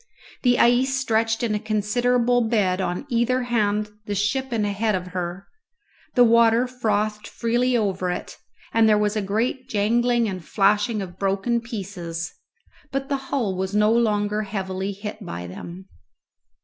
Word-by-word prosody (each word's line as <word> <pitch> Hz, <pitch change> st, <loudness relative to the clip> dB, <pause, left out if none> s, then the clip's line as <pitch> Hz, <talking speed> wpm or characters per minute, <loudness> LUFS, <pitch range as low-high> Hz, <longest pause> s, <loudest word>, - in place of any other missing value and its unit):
The 245 Hz, -1 st, +3 dB
ice 250 Hz, +3 st, +4 dB
stretched 225 Hz, -3 st, 0 dB
in 225 Hz, -2 st, 0 dB
a 210 Hz, -, 0 dB
considerable 235 Hz, +3 st, +1 dB
bed 195 Hz, -5 st, +1 dB
on 180 Hz, +7 st, -2 dB
either 250 Hz, 0 st, +1 dB
hand 210 Hz, -3 st, 0 dB, 0.2 s
the 205 Hz, -, -2 dB
ship 235 Hz, +7 st, 0 dB
and 220 Hz, -3 st, 0 dB
ahead 205 Hz, +1 st, 0 dB
of 180 Hz, 0 st, -4 dB
her; 180 Hz, +1 st, -4 dB, 0.7 s
the 245 Hz, -, +7 dB
water 230 Hz, +1 st, +5 dB
frothed 215 Hz, -4 st, -1 dB
freely 240 Hz, +2 st, +1 dB
over 190 Hz, -4 st, -1 dB
it, 180 Hz, -, -4 dB, 0.4 s
and 225 Hz, -1 st, +5 dB
there 210 Hz, -, +5 dB
was 210 Hz, 0 st, +1 dB
a 215 Hz, -, 0 dB
great 235 Hz, +6 st, -2 dB
jangling 235 Hz, +2 st, +2 dB
and 185 Hz, -4 st, -5 dB
flashing 205 Hz, +3 st, +2 dB
of 180 Hz, -1 st, -10 dB
broken 200 Hz, +5 st, 0 dB
pieces, 180 Hz, -7 st, -5 dB, 0.6 s
but 270 Hz, +1 st, -3 dB
the 280 Hz, -, +1 dB
hull 225 Hz, -9 st, 0 dB
was 190 Hz, +2 st, -3 dB
no 210 Hz, +1 st, +4 dB
longer 210 Hz, -2 st, +1 dB
heavily 195 Hz, -1 st, -3 dB
hit 205 Hz, +2 st, -7 dB
by 85 Hz, +1 st, -6 dB
them. 170 Hz, -, -9 dB
215 Hz, 155 wpm, -23 LUFS, 195-235 Hz, 0.7 s, the